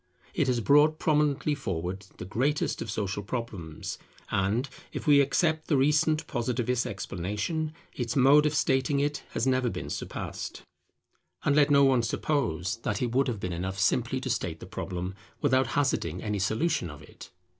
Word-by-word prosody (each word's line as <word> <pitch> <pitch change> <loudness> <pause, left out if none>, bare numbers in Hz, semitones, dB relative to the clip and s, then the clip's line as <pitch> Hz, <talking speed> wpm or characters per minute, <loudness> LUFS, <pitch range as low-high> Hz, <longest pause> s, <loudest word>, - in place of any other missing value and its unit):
It - - +1
has 125 -2 +1
brought 150 +5 +5
prominently 150 -1 +2
forward 95 - -4
the - - -6
greatest 130 +10 0
of - - -4
social 100 -2 -2
problems; 100 -8 -5 0.3
and, 105 +7 +1 0.2
if - - -5
we 145 -2 +7
except 155 +2 +1
the 150 - +3
recent 150 +3 +3
Positivist 125 -1 -1
explanation, 105 - -3 0.2
its 120 -2 -3
mode 145 +3 +6
of 150 - -1
stating 135 0 +2
it 145 +1 0
has 115 - 0
never 130 -2 +2
been - - -5
surpassed. - - -5 0.8
And 140 - +3
let 150 -1 +5
no 140 -1 +6
one 130 -3 +4
suppose 110 - -1
that 115 - -2
it 120 - -1
would 135 +2 +3
have 115 -5 -2
been 90 -2 -3
enough 95 +3 -3
simply 115 +6 +1
to 130 - -4
state 85 -6 -2
the - - -9
problem, 90 -1 -4 0.3
without 130 -3 +3
hazarding 90 - 0
any 105 -1 -1
solution 110 - 0
of 75 0 -10
it. - - -13
125 Hz, 165 wpm, -28 LUFS, 100-145 Hz, 0.8 s, we